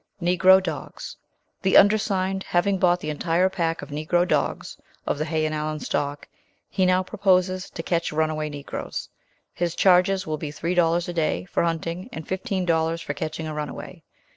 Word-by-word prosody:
"NEGRO 185 +2 +5
DOGS. 185 - -6 0.5
The 190 -1 +4
undersigned, 195 -2 +3
having 190 +2 +1
bought 180 -1 +3
the 155 - -3
entire 170 +4 +1
pack 165 -3 -2
of - - -9
Negro 165 +4 +1
dogs - - -1 0.3
(of - - -1
the 155 - 0
Hay 155 -1 0
and 155 - -1
Allen 155 0 -2
stock), 145 0 -3 0.4
he 185 -1 +1
now 185 0 +3
proposes 185 -2 +1
to 165 - -7
catch 170 -1 -1
runaway 155 0 -1
Negroes. 145 -1 -6 0.4
His 170 -1 -2
charges 190 +1 +4
will 155 -2 -2
be 150 - -4
three 165 +4 -3
dollars 170 -1 +2
a 175 - -4
day 155 - 0
for - - -1
hunting, 170 +4 -2
and 160 -9 -8
fifteen 190 -1 -2
dollars 165 -1 +1
for 145 - -4
catching 160 +2 -4
a 155 - -4
runaway. 150 -1 -6
170 Hz, 175 wpm, -24 LUFS, 155-185 Hz, 0.5 s, NEGRO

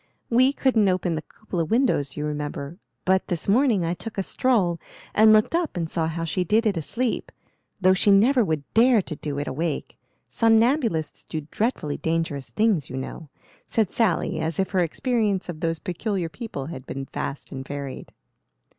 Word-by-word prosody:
We 255 +3 +5
couldn't 240 -8 +2
open 180 -2 0
the 155 - -2
cupola 180 -1 -4
windows, 190 - +1
you 150 - -2
remember, 150 +2 -4 0.3
but 190 0 +2
this 170 -3 -3
morning 220 -4 +3
I 165 - 0
took 220 +4 -7
a 195 - 0
stroll 190 -8 +1 0.3
and 215 +1 +6
looked 215 +5 +4
up 335 - 0
and 165 -2 -1
saw 160 -1 0
how 165 +1 -3
she 180 +3 0
did 215 +6 +2
it 210 -3 +2
asleep, 230 - -2 0.5
though 185 -1 +5
she 195 +2 +2
never 235 +6 +5
would 155 -6 -1
dare 230 -2 +5
to 155 - -5
do 145 -1 -4
it 145 - -3
awake. 160 +2 -3 0.3
Somnambulists 225 - +2
do 155 - -5
dreadfully 210 - -1
dangerous 160 -4 -2
things, 210 - +1
you 130 - -5
know," 140 +3 -6 0.4
said 220 -5 +1
Sally, 220 -8 +1
as 160 0 -2
if 190 - 0
her 190 - +1
experience 205 - 0
of 160 -3 -5
those 165 -1 -1
peculiar 180 0 -3
people 185 - -6
had 135 -4 -8
been 135 0 -5
vast 140 +1 -5
and 130 -1 -5
varied. 140 -1 -6
180 Hz, 180 wpm, -24 LUFS, 155-225 Hz, 0.5 s, and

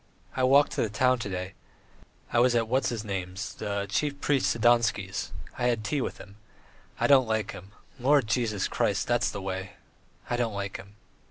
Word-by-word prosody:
I 130 - -1
walked 140 +3 +5
to - - -1
the 110 - 0
town 125 +4 +2
to 105 - -4
day; 90 0 -4 0.8
I 120 - +4
was 120 0 +4
at 115 -1 +2
what's 130 +4 +1
his 115 -2 -4
name's 95 0 -4
the 100 -1 -3
chief 140 +8 -1
priest 140 -2 +2
Sidonsky's.... 115 -4 +1 0.3
I 125 - +2
had 115 -3 0
tea 140 +6 -1
with - - -3
him. 100 0 -13 0.6
I - - +2
don't 135 -4 +6
like 110 -1 -1
him. 95 +2 -11 0.3
Lord 135 +1 +4
Jesus 110 -3 0
Christ.... - - 0
That's - - +1
the 100 - -6
way. 95 0 -4 0.5
I 120 - -1
don't 115 -4 -1
like 100 -1 -4
him." 100 +1 -13
110 Hz, 190 wpm, -28 LUFS, 100-125 Hz, 0.8 s, don't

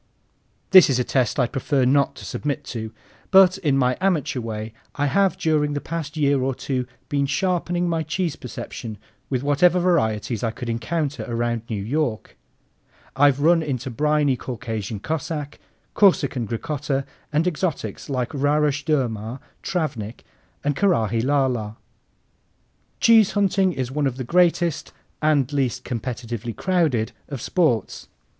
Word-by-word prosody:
This 185 -4 +9
is 130 - +2
a 125 - +1
test 130 +1 0
I'd 125 -2 +1
prefer 135 -1 +1
not 140 +2 +3
to - - -10
submit 145 -2 -3
to, 110 -2 -5 0.4
but 190 -1 +6
in 145 -7 +1
my 125 -1 +2
amateur 170 -9 +1
way 110 -1 -5 0.2
I 145 - 0
have 195 +7 +2
during 150 -2 +1
the 145 - -1
past 160 -1 -5
year 140 -2 +2
or 130 0 -1
two 125 -2 -3 0.2
been 140 -1 0
sharpening 175 +2 0
my 165 -1 0
cheese 160 +1 -2
perception 115 -2 -7 0.3
with 130 -1 -1
whatever 165 +6 +4
varieties 115 - +1
I 115 - +1
could 115 +2 -6
encounter 145 +6 -2
around 120 -1 -1
New 105 -4 -3
York. 120 -3 -2 0.8
I've 140 0 +4
run 165 +2 +5
into 135 -4 -3
briny 150 +1 +2
Caucasian 115 -5 -5
Cossack, 150 0 -4 0.3
Corsican 140 - +3
Gricotta, 135 +3 -2 0.3
and 155 +3 +1
exotics 155 - -2
like 125 -3 -2
Rarush 145 +1 +1
Durmar, 120 -5 -1 0.2
Travnik, 120 - -3 0.4
and 145 0 0
Karaghi 115 - +1
La 140 +1 +3
la. 110 -4 -3 1.2
Cheese 225 -3 +5
hunting 195 -2 +2
is 130 -6 -3
one 145 0 0
of 130 -1 -4
the 130 - -3
greatest 170 +2 +1 0.3
and 145 -3 +2
least 130 -3 0
competitively 120 -1 -4
crowded 160 -12 +1 0.2
of 140 -3 -5
sports. 125 - 0
140 Hz, 145 wpm, -23 LUFS, 120-160 Hz, 1.2 s, This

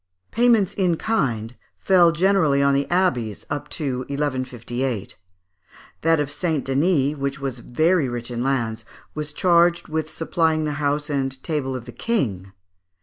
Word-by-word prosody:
Payments 230 -5 +3
in 180 -4 +1
kind 125 - -1 0.2
fell 180 -3 +5
generally 165 -4 +3
on 140 0 +4
the 140 0 0
abbeys, 130 - 0
up 145 - -4
to 135 -5 -2
1158. 130 -5 -3 0.9
That 165 0 +3
of 145 -1 -1
St. 155 -1 -1
Denis, 145 +1 +2
which 140 0 -3
was 135 -3 -4
very 155 +5 +1
rich 120 0 -5
in 120 0 -3
lands, 115 -4 -1 0.3
was 150 0 -4
charged 175 0 +3
with 155 0 -2
supplying 160 -1 0
the 150 - -1
house 145 +1 0
and 135 -2 -1
table 145 -5 -2
of 125 -2 -6
the 120 - -9
King. 105 - -2
145 Hz, 145 wpm, -22 LUFS, 130-165 Hz, 0.9 s, fell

